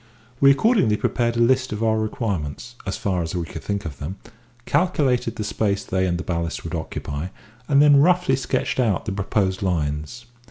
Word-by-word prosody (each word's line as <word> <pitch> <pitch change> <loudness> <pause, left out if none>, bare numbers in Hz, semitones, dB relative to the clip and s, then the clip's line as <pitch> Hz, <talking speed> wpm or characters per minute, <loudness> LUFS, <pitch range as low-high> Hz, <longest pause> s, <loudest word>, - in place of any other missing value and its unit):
We 140 - +7
accordingly 140 - +3
prepared 120 0 0
a - - +2
list 130 +2 +3
of 105 +1 -3
our 110 -1 +2
requirements, 110 - -3
as 95 - -2
far 95 -3 -1
as 85 +2 -4
we 85 -1 -2
could - - -8
think 100 -2 -3
of 75 -4 -7
them, 75 +6 -5 0.5
calculated 130 -10 +1
the 105 - -3
space 100 -1 -1
they 95 0 0
and 85 -1 0
the 90 - -4
ballast 85 -1 -3
would 85 - -6
occupy, 80 -1 -4 0.4
and 140 0 +5
then 145 -1 +7
roughly 180 -2 +3
sketched 135 0 -1
out 110 -5 +1
the 110 - -2
proposed 95 -1 -1
lines. 80 +4 -2
105 Hz, 190 wpm, -23 LUFS, 90-125 Hz, 0.5 s, We